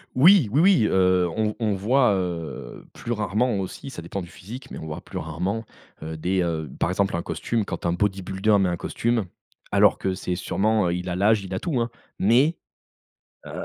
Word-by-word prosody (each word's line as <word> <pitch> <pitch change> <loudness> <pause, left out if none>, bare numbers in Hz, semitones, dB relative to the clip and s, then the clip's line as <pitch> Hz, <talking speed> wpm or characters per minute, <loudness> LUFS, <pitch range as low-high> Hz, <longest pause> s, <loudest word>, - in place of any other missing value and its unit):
Oui, 165 - +7
oui, 145 +6 +3
oui, 180 - +5
heu, 90 -1 +3
on 110 -1 0
on 110 -3 +1
voit, 120 +4 +3
heu, 85 -8 -5
plus 120 - -6
rarement 105 +2 0
aussi, 95 +8 -6
ça 85 - -7
dépend 95 +3 -4
du 85 - -9
physique, 105 +10 -10
mais - - -7
on - - -7
voit 75 0 -6
plus - - -8
rarement, 90 +8 -3 0.4
heu, 80 0 -5
des, 90 +4 0
heu, 80 -4 -2
par - - +1
exemple, 95 -1 0
un 85 - -2
costume 115 -3 -2
quand 85 -3 -5
un 85 - +1
bodybuilder 95 +2 +1
met 95 -2 +2
un 85 - -2
costume 115 +3 -1 0.5
alors - - +5
que 95 - -1
c'est 90 -1 -3
sûrement, 105 +2 +1
heu, 85 - 0
il 90 +1 -4
a 90 - -2
l'âge, 105 +2 +3
il 95 0 -7
a - - -1
tout 150 -8 -1
hein, 115 0 0 0.3
mais 130 - +4 0.9
heu, - - -9
95 Hz, 205 wpm, -24 LUFS, 90-115 Hz, 0.9 s, Oui